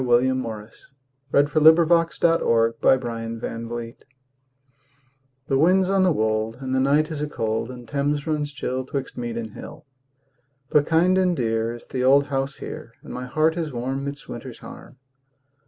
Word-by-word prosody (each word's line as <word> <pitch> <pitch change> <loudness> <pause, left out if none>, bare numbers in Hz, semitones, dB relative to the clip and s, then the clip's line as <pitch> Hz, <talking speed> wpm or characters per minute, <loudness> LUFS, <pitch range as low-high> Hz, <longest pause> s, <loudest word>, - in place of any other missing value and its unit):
William 130 +1 +3
Morris 110 -3 -8 0.4
Inscription 155 +2 +6
for 170 - +3
an 165 0 +2
Old 115 0 +1 0.8
Bed 115 0 -6 1.5
THE 135 - +2
wind's 185 +4 +4
on 195 -1 +3
the 185 - +4
wold 110 -3 -1
And 130 -1 -4
the 130 - +2
night 145 +4 +2
is 150 -2 -4
a 150 - -1
cold, 115 -4 -2
And 125 -2 -10
Thames 145 +2 -1
runs 150 -2 -2
chill 130 -1 -3
'Twixt 135 0 -5
mead 120 -1 -4
and 110 -2 -5
hill. - - -11 0.9
But 150 -1 +3
kind 180 +3 +3
and 180 -2 +2
dear 115 -2 -1
Is 120 - -13
the 130 -1 -3
old 140 +2 +5
house 135 -1 -2
here - - -9
And - - -9
my 125 0 -5
heart 155 +4 +1
is 165 -3 -3
warm 130 +2 -3
Midst 140 0 -7
winter's - - -8
harm. - - -12
135 Hz, 165 wpm, -23 LUFS, 120-155 Hz, 1.5 s, Inscription